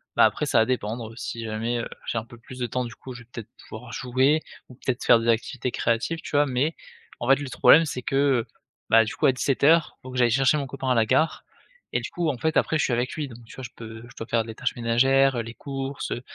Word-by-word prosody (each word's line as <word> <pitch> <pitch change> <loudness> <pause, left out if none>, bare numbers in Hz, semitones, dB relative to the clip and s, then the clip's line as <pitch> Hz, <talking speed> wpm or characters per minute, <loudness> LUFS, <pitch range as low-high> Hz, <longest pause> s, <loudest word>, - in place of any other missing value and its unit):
bah, - - +6
après - - 0
ça - - +3
va 110 - +4
dépendre 115 -2 -3
si 115 -1 -5
jamais, 115 +2 -2
heu, 115 - -3 0.2
j'ai - - -2
un 110 - -3
peu 120 -1 -14
plus 125 +2 -12
de 120 - -1
temps 125 +2 -2
du 120 - -9
coup, 130 - -10
je 120 0 -11
vais - - -26
peut-être 115 -2 -8 0.2
pouvoir 115 +2 -9
jouer 130 +5 +2 0.3
ou 125 - -13
peut-être 130 0 -3
faire 120 - +6
des 115 - -3
activités 120 +2 0
créatives, 115 +10 -1
tu - - -8
vois? 145 - +5
Mais 140 +4 0 0.4
en 120 - -4
fait, 135 - +7
le 145 -2 -5
problème 145 +6 +6
c'est 130 -4 -4
que, 135 +2 -3
heu, 135 -4 +2 0.4
bah, 115 0 +6
du 110 - -5
coup - - 0
à - - +6
17:00, 140 +5 +2
faut 130 - -10
que 130 - -6
j'aille 120 -2 +4
chercher 135 +4 +3
mon 140 -2 -3
copain 130 0 -4
à 125 - +3
la 115 -1 +3
gare 155 +8 +1 0.5
et - - +1
du - - -5
coup, 170 -2 -1
en 135 - -2
fait, 160 +4 0
après, 160 - +2
je - - +1
suis - - 0
avec 120 +2 -1
lui 150 -4 -4
donc 120 -1 -13
tu - - -13
vois? 130 - -8
Je 125 - -6
peux 110 -1 -9
je - - -17
dois 115 - -6
faire 115 -1 +1
les 115 0 -8
tâches 125 +2 -2
ménagères, 130 +3 +3
heu, - - 0
les 115 0 -8
courses, 135 +1 -5
heu, 120 - -3
125 Hz, 280 wpm, -25 LUFS, 115-135 Hz, 0.5 s, fait